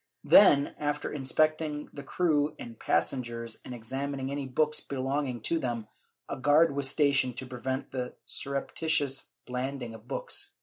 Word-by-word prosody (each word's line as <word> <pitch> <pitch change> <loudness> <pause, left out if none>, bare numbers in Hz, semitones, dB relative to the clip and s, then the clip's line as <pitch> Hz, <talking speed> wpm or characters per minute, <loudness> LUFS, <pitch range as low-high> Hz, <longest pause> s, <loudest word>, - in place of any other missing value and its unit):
Then, 145 -8 +6
after 145 0 -2
inspecting 150 +2 0
the 145 - -7
crew 150 -1 +1
and 115 -1 -9
passengers 115 -3 0
and 125 - -7
examining 135 +3 -3
any 140 -1 -3
books 150 +4 +2
belonging 135 -2 -2
to 165 +8 0
them, 120 -5 -3 0.4
a - - -4
guard 145 +2 +4
was 140 -1 +2
stationed 140 -4 +2
to 130 - -4
prevent 130 +1 -4
the 125 -1 -4
surreptitious 140 0 0 0.2
landing 125 -1 -4
of 110 +1 -13
books. 135 - -1
135 Hz, 140 wpm, -29 LUFS, 125-145 Hz, 0.4 s, Then